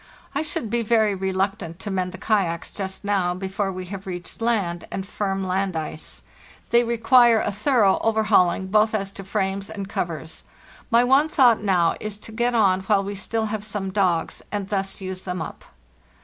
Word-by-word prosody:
I - - 0
should 245 -8 -3
be 235 0 +1
very 220 -2 +3
reluctant 190 -2 -2
to 205 - -4
mend 185 -1 -1
the 190 - -8
kayaks 190 -5 0
just 190 -1 -5
now, 190 -3 +1
before 195 +1 -2
we 185 0 -6
have 195 0 -7
reached 180 +3 -7
land 200 -7 0
and 190 - -3
firm 195 -1 -2
land 190 0 -1
ice. 155 0 -6 0.5
They 235 0 +5
require 235 0 +5
a - - -1
thorough 210 -2 +3
overhauling, 215 -5 +3
both 215 +3 +3
as 195 -2 -2
to 195 - -9
frames 195 0 -2
and 200 -3 -5
covers. 160 -4 -4 0.5
My 235 0 +5
one 270 +5 +4
thought 245 -8 +4
now 180 -5 +2
is 215 -1 -5
to 215 - -11
get 240 +2 0
on 190 -4 +3
while 195 +1 +2
we 200 +1 -4
still 220 +3 -2
have 215 -1 -3
some 200 -2 -4
dogs, 185 -5 0
and 200 -2 -3
thus 195 -1 -2
use 185 -1 -5
them 180 -1 -4
up. - - -7
195 Hz, 185 wpm, -23 LUFS, 190-220 Hz, 0.5 s, They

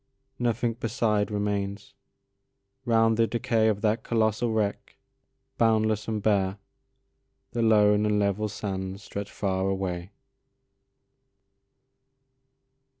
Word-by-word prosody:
Nothing 120 -1 0
beside 110 -3 0
remains: 100 -1 -3 0.9
round 115 -2 +3
the 115 0 +3
decayOf 110 -3 +1
that 110 0 +1
colossal 110 0 0
wreck, 105 -2 -2 0.6
boundless 110 -2 +2
and 110 -2 -2
bare, 100 -2 +1 0.9
The 120 - -2
lone 105 -2 +4
and 105 0 +2
level 100 +1 0
sands 95 -1 -5
stretch 100 -1 -6
far 95 -1 -1
away. 95 -2 -3
105 Hz, 90 wpm, -27 LUFS, 100-115 Hz, 0.9 s, lone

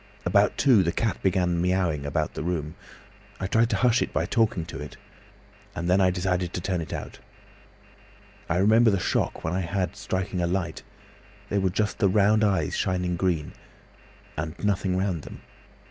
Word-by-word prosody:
About - - +3
two, 125 -8 +5
the 85 - +1
cat 110 +2 -1
began 90 -2 +1
miaowing 90 -5 0
about 70 - -1
the - - -5
room. 80 -2 -2 0.7
I 95 - -2
tried 115 +4 +2
to - - 0
hush 125 -1 +3
it - - -1
by - - 0
talking 110 -8 +1
to 80 -4 -8
it, 75 -2 -9 0.8
and 85 0 -3
then 90 +2 +4
I 95 - +5
decided 90 -1 -1
to - - -2
turn 90 0 -2
it 80 - -7
out. - - -6 1.3
I 85 - +1
remember 110 +5 +5
the 100 - +2
shock - - -1
I 90 +4 -1
had 95 +1 -1
when - - -22
striking 95 -2 -3
a 85 - +1
light—there 90 +2 -5
were 95 - +2
just 105 +3 -1
the 100 - +4
round 105 +2 +3
eyes 95 -8 +1
shining 90 -1 0
green—and 80 -1 -6
nothing 95 -2 +1
round 95 -4 -1
them. - - -11
90 Hz, 175 wpm, -26 LUFS, 85-100 Hz, 1.3 s, two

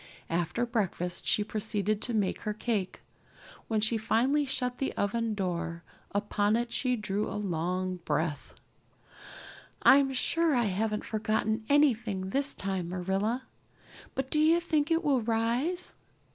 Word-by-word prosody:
After 175 +8 0
breakfast 190 -6 -2
she 210 - +3
proceeded 215 -1 -1
to 245 - -1
make 205 -3 0
her 210 0 -3
cake. 210 -5 -2 0.7
When 220 -1 +1
she 220 +1 +3
finally 260 +7 +2
shut 250 -1 -2
the 270 - -1
oven 220 +2 0
door 170 -3 -3 0.3
upon 205 +1 +1
it 235 0 -1
she 250 0 +1
drew 210 -2 -2
a - - -4
long 185 -1 -2
breath. 155 -2 -2 1.3
"I'm 275 0 +6
sure 320 +4 +2
I 240 -2 +2
haven't 210 +2 -1
forgotten 220 0 -1
anything 230 -10 +2
this 275 +6 +2
time, 190 -3 -3
Marilla. 195 +7 -1 0.7
But 265 0 -3
do 305 - +2
you 320 +2 +5
think 315 -3 0
it 330 +1 +2
will 280 -5 +2
rise? 235 +11 -1
220 Hz, 140 wpm, -29 LUFS, 195-255 Hz, 1.3 s, I'm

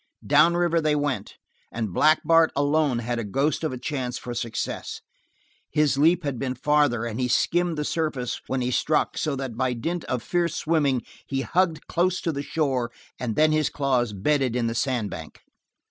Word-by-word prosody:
Down 150 +4 +5
river 170 -1 +2
they 155 -1 +2
went, 145 -2 -2 0.4
and 110 -4 -3
Black 155 - +4
Bart 165 0 +5
alone 145 -2 +2
had 120 0 -2
a - - -2
ghost 135 +10 0
of 155 - 0
a 130 - -5
chance 125 -1 -3
for 120 - -6
success. 115 -1 -4 0.7
His 150 -2 +2
leap 165 +5 +3
had 140 -5 -3
been 130 -1 -2
farther 145 -4 +2
and 115 0 -4
he 125 - +1
skimmed 175 +6 +1
the 150 - -1
surface 150 -8 -2
when 130 -1 -1
he 125 0 -1
struck 155 +4 +1
so 150 -3 -1
that 130 -4 -5
by 130 +1 0
dint 165 +9 -3
of 125 -3 -2
fierce 170 -2 0
swimming 145 -6 +1 0.2
he 135 -1 -1
hugged 170 0 0
close 180 +1 +1
to 165 - -1
the 140 -2 -3
shore, 135 -6 -1 0.3
and 115 -4 -2
then 155 0 +4
his 155 -1 +2
claws 130 -5 0
bedded 125 +5 0
in 120 -1 0
the 115 - -1
sand 120 -3 -1
bank. - - -9
140 Hz, 190 wpm, -25 LUFS, 125-155 Hz, 0.7 s, Down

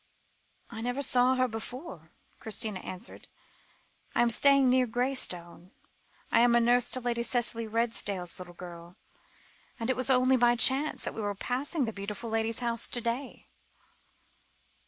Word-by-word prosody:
"I 225 -1 -7
never 245 +4 -2
saw 255 0 +5
her 255 0 +1
before," 225 - -8 0.3
Christina 220 -2 -2
answered. 185 0 -9 0.9
"I 240 - +4
am 235 - +1
staying 275 +2 +4
near 255 0 +3
Graystone. 200 -9 -3 0.6
I - - +4
am 240 0 +4
nurse 240 +1 +3
to 255 - +1
Lady 240 -1 -2
Cicely 235 -1 +1
Redesdale's 210 -6 -1
little 175 -1 -10
girl, 175 0 -11 0.8
and 230 +2 0
it - - -1
was 255 0 -2
only 255 0 +4
by 240 0 +4
chance 270 +5 +4
that - - -3
we 225 - -6
were 205 -1 -3
passing 265 - -2
the 225 - -5
beautiful 210 +3 -6
lady's 225 +1 -1
house 235 -1 0
to 245 - -2
day." 240 +3 -5
235 Hz, 150 wpm, -29 LUFS, 215-255 Hz, 0.9 s, saw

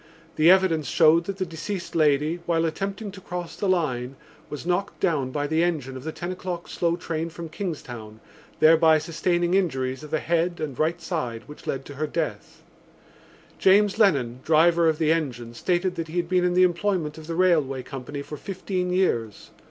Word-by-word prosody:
The 155 +2 +5
evidence 185 -5 +4
showed 165 +2 +4
that 195 +1 -4
the 190 - -1
deceased 170 +3 -5
lady, 155 +1 +2
while 165 -1 +2
attempting 195 +5 -3
to 190 0 -12
cross 175 -1 -6
the 200 - -1
line, 135 -8 0 0.3
was 150 +1 -7
knocked 180 +2 -1
down 155 -9 +1
by 145 +2 -2
the 160 +2 +1
engine 150 -7 -1
of 130 - -8
the 160 - -4
ten 175 +3 -5
o'clock 180 -2 -5
slow 170 -1 0
train 165 -1 -3
from 170 0 -8
Kingstown, 120 - -6 0.4
thereby 160 0 +6
sustaining 175 +2 0
injuries 130 -9 0
of 150 - -9
the 155 - 0
head 170 +2 0
and 145 -5 -5
right 165 +3 +1
side 140 -10 -4
which 150 - -13
led 135 0 -3
to 145 - -9
her 155 +2 -2
death. 150 -10 -4 1.0
James 200 +2 +4
Lennon, 135 - +3
driver 165 +1 +4
of 155 - 0
the 160 -1 +2
engine, 125 -8 -2
stated 180 +8 0
that 165 -2 -4
he 160 +3 -6
had 175 -1 0
been 180 0 +2
in 180 0 +1
the 185 - +6
employment 175 -4 0
of 155 - -11
the 165 - -3
railway 155 -8 +2
company 135 +2 -7
for 150 - -8
fifteen 185 0 -3
years. 120 - -1
165 Hz, 190 wpm, -25 LUFS, 150-180 Hz, 1.0 s, thereby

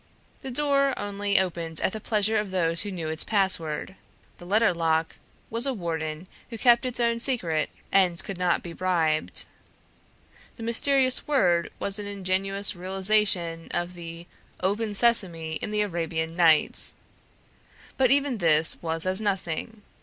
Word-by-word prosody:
The 265 - -6
door 275 0 0
only 205 0 -1
opened 170 -3 -1
at - - -1
the 220 - -5
pleasure 215 0 +1
of 210 -2 -4
those 170 -3 +2
who 205 - -3
knew 170 -5 -5
its 160 +1 +3
password. 190 -5 -1 0.5
The 175 - -12
letter 215 +1 +2
lock 165 -1 -1 0.3
was 230 +4 0
a 270 - -1
warden 160 -3 -5 0.2
who 230 - -7
kept 240 +2 +3
its 250 -1 -2
own 235 -1 0
secret 175 - 0 0.2
and 185 -2 +2
could 190 -2 -7
not 180 -1 0
be 170 - -8
bribed; 165 -4 0 1.1
the 230 - -10
mysterious 255 +3 +2
word 180 -12 +1
was 200 +1 -3
an 205 - -6
ingenious 195 0 0
realization 185 -2 +1
of 175 +1 -3
the 170 -1 -9 0.3
"Open 205 +3 -1
sesame!" 175 -9 +2
in - - -4
the 210 0 -1
Arabian 165 -4 -3
Nights. 165 -3 +5 1.0
But 260 -2 +2
even 275 -4 +1
this 160 -2 +2
was 165 0 -1
as 185 +3 +4
nothing. 200 +1 -4
190 Hz, 150 wpm, -25 LUFS, 165-220 Hz, 1.1 s, Nights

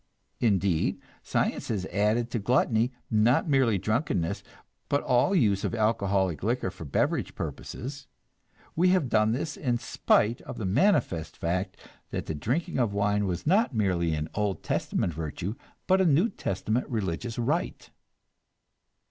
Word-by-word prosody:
Indeed, 95 -7 +1 0.2
science - - -1
has 100 -5 -2
added 105 +5 0
to 115 - -1
gluttony, 120 +1 +2 0.2
not 115 +8 +3
merely 130 -8 +3
drunkenness, 110 - -1 0.5
but 140 - +1
all 130 +10 +3
use 105 - +2
of - - -1
alcoholic 100 -7 +1
liquor 115 -2 -1
for 90 -3 -9
beverage 70 - 0
purposes; 135 +2 -6 0.7
we 180 +3 +4
have 180 -8 +2
done 110 -1 +3
this 145 +6 -2
in 125 -4 0
spite 115 0 +1
of - - -8
the 110 - -3
manifest 95 - +1
fact 90 +3 -2 0.3
that - - -4
the - - -3
drinking 135 - -2
of 110 -5 +1
wine 100 0 +1
was 90 -2 -3
not 195 - +3
merely 90 -6 +1
an 75 0 -3
Old 105 -2 -1
Testament 85 - -1
virtue, 80 +5 -4 0.3
but 190 +1 +4
a - - +3
New 170 +8 +4
Testament 110 - -2
religious 110 +1 -3
rite. 145 +10 -2
110 Hz, 145 wpm, -27 LUFS, 95-130 Hz, 0.7 s, we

